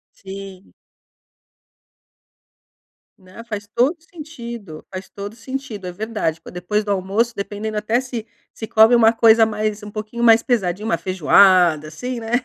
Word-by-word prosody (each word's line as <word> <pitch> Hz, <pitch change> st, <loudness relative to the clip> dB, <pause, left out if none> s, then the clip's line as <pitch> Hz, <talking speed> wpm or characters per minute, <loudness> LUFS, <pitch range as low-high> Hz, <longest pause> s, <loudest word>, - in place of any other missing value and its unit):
Sim. 195 Hz, -1 st, -10 dB, 2.4 s
Né, 185 Hz, +4 st, -13 dB
faz 210 Hz, -3 st, -6 dB
todo 265 Hz, +8 st, +3 dB
sentido, 235 Hz, -, -9 dB
faz 185 Hz, 0 st, -7 dB
todo 205 Hz, +2 st, -8 dB
sentido. 245 Hz, -4 st, -7 dB
É 180 Hz, -, -4 dB
verdade, 210 Hz, -4 st, -2 dB
tipo, 165 Hz, -, -13 dB
depois 195 Hz, +4 st, -2 dB
do 205 Hz, -, -3 dB
almoço 200 Hz, +5 st, 0 dB
dependendo 210 Hz, +2 st, -4 dB
até 220 Hz, +3 st, +1 dB
se 250 Hz, -4 st, -6 dB, 0.3 s
se 220 Hz, -, -7 dB
come 220 Hz, +1 st, +6 dB
uma 225 Hz, -1 st, +5 dB
coisa 225 Hz, -1 st, +5 dB
mais 215 Hz, 0 st, -2 dB
um 210 Hz, -, -8 dB
pouquinho 215 Hz, +3 st, -5 dB
mais 225 Hz, -1 st, +6 dB
pesadinha, 205 Hz, -5 st, -1 dB
uma 225 Hz, -6 st, 0 dB
feijoada, 175 Hz, -1 st, +4 dB
assim, 240 Hz, +11 st, -5 dB
né, 225 Hz, 0 st, -7 dB
215 Hz, 145 wpm, -20 LUFS, 190-230 Hz, 2.4 s, come